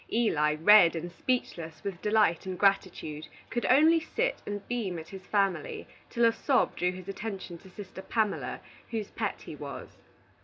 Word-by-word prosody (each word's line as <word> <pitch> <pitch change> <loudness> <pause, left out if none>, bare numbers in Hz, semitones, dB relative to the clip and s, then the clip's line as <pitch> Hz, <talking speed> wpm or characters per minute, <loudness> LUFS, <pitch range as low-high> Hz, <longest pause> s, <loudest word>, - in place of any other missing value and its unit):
Eli, 150 -10 +2
red 170 +1 +7
and 170 +2 -4
speechless 170 - -3
with 190 -3 -5
delight 210 -5 +2
and 185 -1 -3
gratitude, 175 -6 0 0.2
could 240 - -1
only 315 +5 +6
sit - - -2
and 205 -1 -5
beam 220 -8 -2
at 160 0 -8
his 190 -1 -10
family 195 -7 0 0.2
till 235 0 +2
a 230 - +6
sob 260 +3 +1
drew 180 0 +1
his 185 0 -10
attention 195 -3 -5
to 190 - -15
sister 190 0 -9
Pamela, 215 0 -1 0.3
whose 220 -3 -4
pet - - -3
he - - -8
was. - - -8
195 Hz, 165 wpm, -29 LUFS, 175-225 Hz, 0.3 s, red